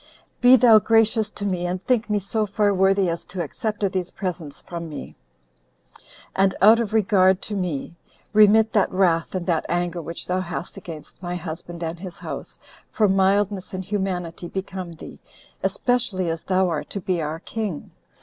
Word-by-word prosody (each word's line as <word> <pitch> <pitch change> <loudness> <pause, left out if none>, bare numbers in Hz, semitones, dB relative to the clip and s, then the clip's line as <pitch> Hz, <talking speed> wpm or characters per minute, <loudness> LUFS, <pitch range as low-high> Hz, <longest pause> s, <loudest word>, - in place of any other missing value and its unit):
Be 250 +1 +8
thou 230 -3 +7
gracious 225 0 +3
to 205 -1 -6
me, 180 -3 -1
and 180 +1 -4
think 240 -3 +1
me 210 - +2
so 210 +2 0
far 205 0 +2
worthy 190 0 +3
as 170 0 -2
to 180 -1 -4
accept 210 +7 -4
of 195 - +2
these 185 -2 -2
presents 170 -7 -5
from 170 -1 -7
me; 150 - -8 1.2
and, 195 0 +3
out 220 +4 +7
of 225 -3 -2
regard 190 -3 +4
to 215 - -5
me, 175 -5 -3 0.4
remit 215 +1 +6
that 205 - +2
wrath 180 -2 +1
and 180 -2 -2
that 170 -3 +1
anger 175 0 -1
which 165 +1 -7
thou 180 +1 0
hast 180 -1 -5
against 160 0 -10
my 175 -1 -4
husband 170 0 -6
and 165 +1 -4
his 180 -2 -8
house, - - -7 0.3
for 215 -3 +3
mildness 195 0 +1
and 185 0 -5
humanity 180 -4 -3
become 190 -2 -5
thee, 165 - -11 0.4
especially 220 -9 0
as 165 0 -4
thou 185 0 +1
art 150 -3 -3
to 200 - -4
be 180 -2 -1
our 155 +1 -3
king." 205 -4 -5
185 Hz, 180 wpm, -23 LUFS, 175-205 Hz, 1.2 s, Be